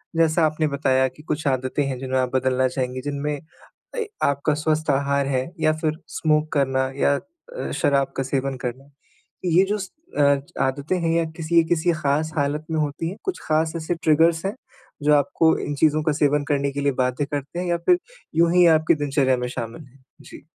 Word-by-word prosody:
जैसा 165 Hz, 0 st, +3 dB
आपने 155 Hz, 0 st, 0 dB
बताया 135 Hz, -2 st, +2 dB
कि 130 Hz, +4 st, -13 dB
कुछ 155 Hz, 0 st, -3 dB
आदतें 130 Hz, +2 st, 0 dB
हैं 130 Hz, -, -3 dB
जिन्हें 130 Hz, 0 st, -1 dB
आप 130 Hz, -1 st, 0 dB
बदलना 130 Hz, 0 st, +2 dB
चाहेंगी, 130 Hz, 0 st, -3 dB
जिनमें 145 Hz, +2 st, -2 dB, 0.6 s
ए, 450 Hz, -2 st, -1 dB, 0.2 s
आपका 140 Hz, +2 st, +1 dB
स्वस्थ 155 Hz, +1 st, -1 dB
आहार 140 Hz, 0 st, +1 dB
है 130 Hz, +2 st, -1 dB
या 155 Hz, 0 st, +3 dB
फ़िर 155 Hz, -1 st, 0 dB
स्मोक 155 Hz, -1 st, 0 dB
करना 130 Hz, -2 st, +1 dB
या 140 Hz, 0 st, +3 dB, 0.4 s
अ, -, -, -4 dB
शराब 140 Hz, -1 st, +1 dB
का 135 Hz, -, 0 dB
सेवन 135 Hz, 0 st, -2 dB
करना। 130 Hz, +3 st, -5 dB, 0.6 s
ये 175 Hz, +1 st, +4 dB
जो 210 Hz, -, +1 dB
स 190 Hz, -2 st, -6 dB, 0.3 s
अ, 140 Hz, -1 st, +4 dB, 0.3 s
आदतें 140 Hz, +7 st, -2 dB
हैं 165 Hz, -1 st, 0 dB
या 165 Hz, -, +1 dB
किसी 165 Hz, +1 st, +3 dB
अ, -, -, -10 dB
किसी 175 Hz, 0 st, +2 dB
ख़ास 155 Hz, +1 st, 0 dB
हालत 145 Hz, +2 st, 0 dB
में 160 Hz, -, 0 dB
होती 150 Hz, +2 st, -2 dB
हैं? 195 Hz, -, -8 dB
कुछ 380 Hz, -, -3 dB
ख़ास 160 Hz, +1 st, +1 dB
ऐसे 165 Hz, +1 st, -2 dB
ट्रिगर्स 160 Hz, +2 st, +3 dB
हैं 195 Hz, -, -2 dB, 0.5 s
जो 150 Hz, +1 st, +4 dB
आपको 160 Hz, +3 st, +3 dB
इन 145 Hz, -, -3 dB
चीज़ों 155 Hz, +1 st, +2 dB
का 155 Hz, -, +2 dB
सेवन 145 Hz, -1 st, +2 dB
करने 140 Hz, -1 st, +1 dB
के 140 Hz, +1 st, -4 dB
लिए 140 Hz, -, +2 dB
बाध्य 125 Hz, +3 st, -1 dB
करते 145 Hz, +4 st, -5 dB
हैं 180 Hz, -, -2 dB
या 175 Hz, 0 st, +1 dB
फिर 360 Hz, -, +5 dB, 0.4 s
यूँ 165 Hz, +1 st, +4 dB
ही 180 Hz, -1 st, +6 dB
आपकी 155 Hz, +1 st, +2 dB
दिनचर्या 140 Hz, -3 st, +1 dB
में 125 Hz, -, -2 dB
शामिल 120 Hz, +3 st, -6 dB
हैं? 130 Hz, +1 st, -23 dB, 0.2 s
जी। -, -, -13 dB
145 Hz, 200 wpm, -23 LUFS, 135-160 Hz, 0.6 s, ही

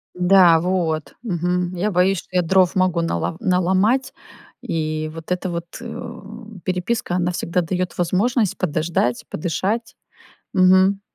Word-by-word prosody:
Да, 180 Hz, -2 st, +5 dB
вот, 165 Hz, -3 st, -1 dB
мгм. 180 Hz, -3 st, -1 dB
Я 190 Hz, +4 st, 0 dB
боюсь, 185 Hz, +1 st, +2 dB
что -, -, -14 dB
я 180 Hz, -, +4 dB
дров 185 Hz, +2 st, +3 dB
могу 185 Hz, -2 st, +2 dB
нало 165 Hz, -, -2 dB
наломать, 190 Hz, +8 st, +1 dB, 0.5 s
и 155 Hz, -8 st, -2 dB
вот 165 Hz, +1 st, -9 dB
эта 180 Hz, +1 st, -1 dB
вот, 170 Hz, -1 st, -4 dB, 0.2 s
э, 235 Hz, -1 st, -7 dB, 0.5 s
переписка, 185 Hz, +1 st, -2 dB
она 180 Hz, 0 st, 0 dB
всегда 175 Hz, 0 st, -1 dB
даёт 180 Hz, +1 st, -3 dB
возможность 200 Hz, +5 st, +1 dB
подождать, 155 Hz, -7 st, -1 dB
подышать. 195 Hz, +8 st, -2 dB, 0.6 s
Мгм. 190 Hz, +2 st, +4 dB
180 Hz, 130 wpm, -21 LUFS, 170-190 Hz, 0.6 s, Да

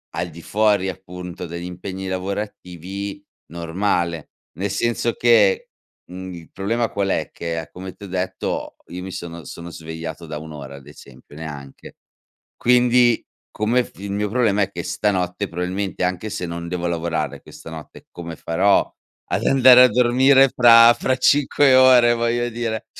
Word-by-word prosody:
al 85 Hz, +1 st, -2 dB
di 85 Hz, -, -11 dB
fuori, 105 Hz, 0 st, +1 dB
appunto, 90 Hz, -1 st, -8 dB
degli 85 Hz, +1 st, -7 dB
impegni 95 Hz, +2 st, -6 dB
lavorativi, 95 Hz, 0 st, -5 dB, 0.3 s
normale. 85 Hz, -1 st, -2 dB, 0.3 s
Nel 100 Hz, +2 st, -2 dB
senso 120 Hz, +3 st, 0 dB
che 115 Hz, -5 st, +3 dB, 0.5 s
mhmm, 95 Hz, 0 st, -7 dB
il 85 Hz, -2 st, -11 dB
problema 115 Hz, +4 st, -1 dB
qual 100 Hz, -1 st, -2 dB
è, -, -, -1 dB
che 80 Hz, -2 st, -5 dB
come 95 Hz, 0 st, -8 dB
ti 100 Hz, -, -11 dB
ho -, -, -9 dB
detto, 95 Hz, 0 st, -4 dB
io 90 Hz, +1 st, -7 dB
mi 95 Hz, -, -7 dB
sono 85 Hz, -2 st, -7 dB
sono 85 Hz, 0 st, -9 dB
svegliato 80 Hz, 0 st, -7 dB
da 75 Hz, -1 st, -6 dB
1 80 Hz, +1 st, -10 dB
ora 70 Hz, -2 st, -9 dB
ad 70 Hz, +1 st, -16 dB
esempio, 70 Hz, -1 st, -15 dB
neanche. 75 Hz, -3 st, -10 dB, 0.6 s
Quindi, 125 Hz, -1 st, +3 dB, 0.3 s
come 115 Hz, +4 st, +1 dB
f -, -, -16 dB
il 100 Hz, 0 st, -6 dB
mio 105 Hz, +1 st, -1 dB
problema 110 Hz, -4 st, +1 dB
è -, -, -1 dB
che -, -, -6 dB
stanotte 95 Hz, -1 st, -1 dB
probabilmente, 90 Hz, +2 st, -3 dB
anche 90 Hz, +4 st, -2 dB
se 90 Hz, -, -4 dB
non 85 Hz, 0 st, -6 dB
devo 90 Hz, -1 st, -3 dB
lavorare 85 Hz, -1 st, -2 dB
questa -, -, -12 dB
notte, 80 Hz, -1 st, -11 dB
come 85 Hz, -1 st, -8 dB
farò 95 Hz, +5 st, +2 dB, 0.4 s
ad -, -, -1 dB
andare 130 Hz, -2 st, +7 dB
a -, -, +6 dB
dormire 130 Hz, +3 st, +4 dB
fra 115 Hz, -1 st, +8 dB
fra 130 Hz, +2 st, 0 dB
5 140 Hz, 0 st, +3 dB
ore 125 Hz, -2 st, +6 dB
voglio 120 Hz, +1 st, 0 dB
dire, 115 Hz, -2 st, -4 dB
95 Hz, 160 wpm, -21 LUFS, 85-115 Hz, 0.6 s, fra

